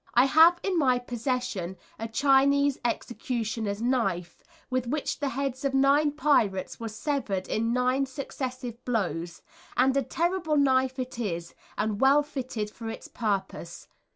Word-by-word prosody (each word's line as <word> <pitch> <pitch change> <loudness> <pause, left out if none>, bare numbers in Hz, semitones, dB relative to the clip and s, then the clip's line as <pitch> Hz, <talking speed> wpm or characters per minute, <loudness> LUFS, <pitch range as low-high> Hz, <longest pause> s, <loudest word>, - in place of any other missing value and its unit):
I 245 +2 +7
have 325 +5 +6
in 375 -4 +1
my 255 -4 +3
possession 245 -6 -3 0.2
a 225 - -3
Chinese 280 +3 +3
executioner's 225 -3 -2
knife, 195 -9 -1 0.3
with 255 -1 0
which 290 +4 -2
the 285 -1 -1
heads 265 0 -3
of 275 -1 0
nine 280 +2 +4
pirates 225 -11 +1
were 230 - -4
severed 220 -5 -2
in 230 +1 0
nine 255 +2 +1
successive 255 -3 -6
blows, 175 -8 -2 0.3
and 265 +1 +4
a 275 - +3
terrible 335 +3 0
knife 260 -2 +3
it 255 -2 -5
is, 170 -7 -3 0.2
and 210 -1 -1
well 275 +2 +5
fitted 250 -7 -4
for 230 - -10
the 225 - -7
purpose. 195 -6 -3
255 Hz, 145 wpm, -27 LUFS, 220-275 Hz, 0.3 s, I